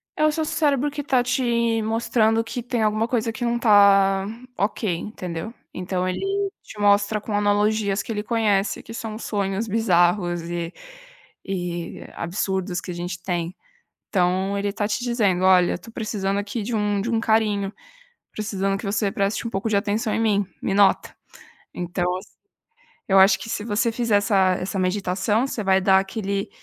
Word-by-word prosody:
É 305 - +2
o 310 - +4
seu 315 +1 -1
cérebro 290 -2 +1
que 295 0 -4
está 265 -3 +2
te 235 -3 +1
mostrando 225 0 +1
que 235 +2 -5
tem 240 -1 -2
alguma 215 +1 +1
coisa 230 -2 0
que 230 +2 -4
não 235 - +1
está 200 -4 +5 0.3
ok, 200 -1 0
entendeu. 180 +1 -6 0.2
Então 185 0 -2
ele 185 - -2 0.4
te 210 - -12
mostra 205 +1 +3
com 210 - -5
analogias 205 0 +1
que - - -6
ele 210 -1 -2
conhece, 215 -3 0
que 230 - -10
são 220 -2 -5
sonhos 200 -1 -2
bizarros 175 -4 +2
e 170 0 -4 0.7
e 175 -3 -4
absurdos 185 +1 -2
que 180 - -6
a - - -5
gente 175 +1 -5
tem. 175 -1 -2 0.5
Então 190 +1 +1
ele 205 - -1
está 205 +1 -2
te 215 +3 -2
dizendo: 205 -7 +1
"Olha, 185 -1 +5
eu - - -1
estou 205 +6 -13
precisando 200 -3 -2
aqui 205 +2 -3
de 230 +3 -3
um 205 -1 0
de 235 +4 -2
um 230 - +1
carinho, 210 -3 +1 0.6
precisando 195 -2 -2
que 200 - -8
você 205 0 0
preste 200 +4 -1
um - - -3
pouco 195 +2 -2
de 215 - +1
atenção 215 +2 -1
em - - 0
mim, 205 -3 +2
me 195 - -1
nota!". 200 -1 +3 0.6
Então, 175 0 -3
assim, 190 - -13 0.8
eu 195 - +5
acho 190 0 +6
que 225 - -7
se 210 - -3
você 220 +1 +1
fizer 230 -2 +1
essa 195 -2 +3
essa 190 +2 -3
meditação, 190 +5 0
você 215 - -4
vai 190 0 +4
dar 190 0 +5
aquele 200 0 -2
205 Hz, 180 wpm, -23 LUFS, 190-225 Hz, 0.8 s, acho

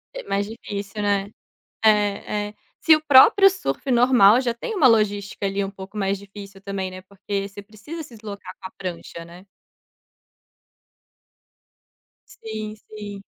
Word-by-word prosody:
É - - -6
mais 200 - -1
difícil, 205 -2 -6
né. 200 -1 0 0.5
É, 210 -1 +2
é. - - -15 0.3
Se 320 - +6
o 310 - -3
próprio 310 +8 +7
surfe 370 -7 -4
normal 240 -3 +6
já 240 -3 -1
tem 430 - -5
uma 305 -9 +5
logística 205 -3 +1
ali 195 0 -1
um 195 - -6
pouco 195 +2 -10
mais 195 -1 0
difícil 200 -1 -12
também, 195 -1 -4
né, 185 0 -9
porque 200 +1 -5
você 205 +1 -10
precisa 225 +11 -9
se 250 -5 -13
deslocar 210 -2 -9
com 190 - -7
a - - -31
prancha, 170 -2 -7
né. 175 +3 -14 2.8
Sim, 215 -1 -7
sim. 205 -2 -8
205 Hz, 150 wpm, -23 LUFS, 195-225 Hz, 2.8 s, próprio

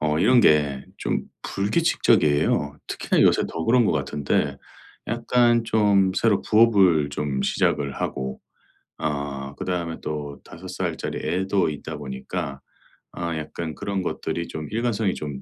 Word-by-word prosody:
어 75 0 +1
이런 120 +7 +5
게 75 -5 +3
좀 - - -1 0.2
불규칙적이에요. 75 - +2
특히나 - - +1
요새 - - +4
더 80 - -4
그런 120 +3 +4
것 - - +2
같은데 75 -1 -1 0.5
약간 120 0 +2
좀 105 -4 +3
새로 100 +1 +2
부업을 100 -9 +4
좀 70 -2 -2
시작을 70 +1 +1
하고 65 0 -3 0.6
아 70 -2 -3
그다음에 85 -3 -3
또 75 -2 -5
5 - - -11
살짜리 - - -3
애도 95 -1 +1
있다 75 - -6
보니까 70 +2 -5 0.5
아 85 -1 -3
약간 80 +1 -5
그런 100 -1 -3
것들이 85 -1 -3
좀 75 -1 -6
일관성이 110 -3 0
좀 70 -3 -6
80 Hz, 265 characters per minute, -24 LUFS, 75-100 Hz, 0.6 s, 이런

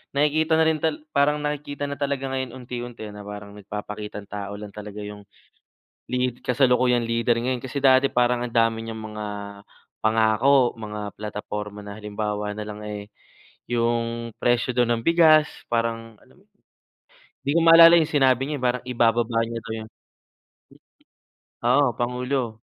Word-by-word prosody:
nakikita 155 +3 +2
na - - +5
rin 160 -1 +2
tala 155 0 -1
parang 150 0 +2
nakikita 145 -1 -3
na 140 - -5
talaga 140 -1 -2
ngayon 130 -2 -3
unti-unti 120 -2 -7
na 105 - -10
parang 105 0 -8
nagpapakitang 105 0 -7
tao 100 0 -5
lang 105 -1 -8
talaga 105 0 -8
yung 105 0 -9 0.9
lead 125 -1 -1
kasalukuyang 125 -1 +3
leader 115 0 +1
ngayon 125 0 -2
kasi 130 +2 -4
dati 130 0 +5
parang 125 0 +2
ang 120 - -6
dami 115 -1 +2
niyang 115 -1 -6
mga 105 -1 -6 0.8
pangako, 115 +4 +3
mga 105 -2 -6
plataporma 105 0 -6
na 100 0 -8
halimbawa 105 0 -3
nalang 105 0 -6
eh, 105 -1 -5 0.7
yung 115 0 -1
presyo 120 +1 +2
dun 120 -1 +2
ng 115 -1 -2
bigas 160 -2 +6 0.2
parang, 115 -1 -2
alam - - -23
mo - - -31
yun, - - -42 0.9
'di 140 - 0
ko - - +5
maalala 165 0 +9
yung 160 - +1
sinabi 135 -4 +3
niya 150 0 -3
eh, - - -9
parang 125 0 0
ibababa 115 -1 +2
niya 115 0 -5
daw 115 -1 -6
yun. - - -16 1.7
Oo, 125 +3 +4
pangulo, 125 -2 -2
120 Hz, 155 wpm, -24 LUFS, 105-135 Hz, 1.7 s, maalala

